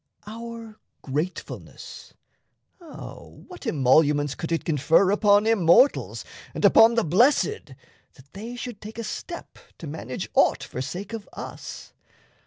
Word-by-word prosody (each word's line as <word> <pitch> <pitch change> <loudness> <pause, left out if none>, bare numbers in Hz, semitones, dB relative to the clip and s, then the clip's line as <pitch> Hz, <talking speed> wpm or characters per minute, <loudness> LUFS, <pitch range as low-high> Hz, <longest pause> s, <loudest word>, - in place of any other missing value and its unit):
Our 230 0 -9 0.2
gratefulness, 150 +7 -6 0.6
O 335 -4 -11
what 360 -7 -10
emoluments 145 - +3
could 165 +2 -6
it 165 - -1
confer 165 +5 +3
Upon 205 0 +4
Immortals 225 - +3 0.3
and - - 0
upon 230 +1 +7
the 230 - +2
Blessed 180 - +2 0.4
That 140 +1 -20
they 225 +5 -7
should 245 -3 -7
take 215 +1 -10
a 230 - -4
step 345 +9 -7 0.2
to - - -9
manage 145 -5 -6
aught - - +3
For 130 - -6
sake 180 - -6
of 220 -2 -7
us? - - -9
200 Hz, 130 wpm, -25 LUFS, 155-230 Hz, 0.6 s, upon